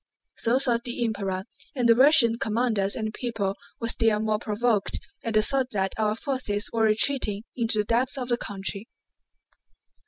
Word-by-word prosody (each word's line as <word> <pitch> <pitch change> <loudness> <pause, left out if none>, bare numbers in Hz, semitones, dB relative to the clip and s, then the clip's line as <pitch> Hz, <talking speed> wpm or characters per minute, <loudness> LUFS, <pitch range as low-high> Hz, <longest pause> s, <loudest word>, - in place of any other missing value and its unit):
So 235 +3 +1
thought 240 -3 +1
the 240 -1 -2
Emperor, 195 -4 -3 0.3
and 245 -3 +1
the 230 - +7
Russian 245 -2 +5
commanders 220 -3 0
and 220 -1 -3
people 215 -6 -3 0.2
were 230 - -2
still 225 -2 +2
more 215 -1 0
provoked 215 -1 0 0.2
at 225 -2 -3
the 215 - +5
thought 265 +1 +2
that 195 -1 -1
our 215 -1 +1
forces 230 -5 -3
were 225 -1 +2
retreating 215 -1 +2
into 230 -3 +1
the 210 - +1
depths 245 +5 0
of 250 -2 -4
the 240 - +1
country. 200 +1 -4
225 Hz, 165 wpm, -25 LUFS, 210-245 Hz, 0.3 s, the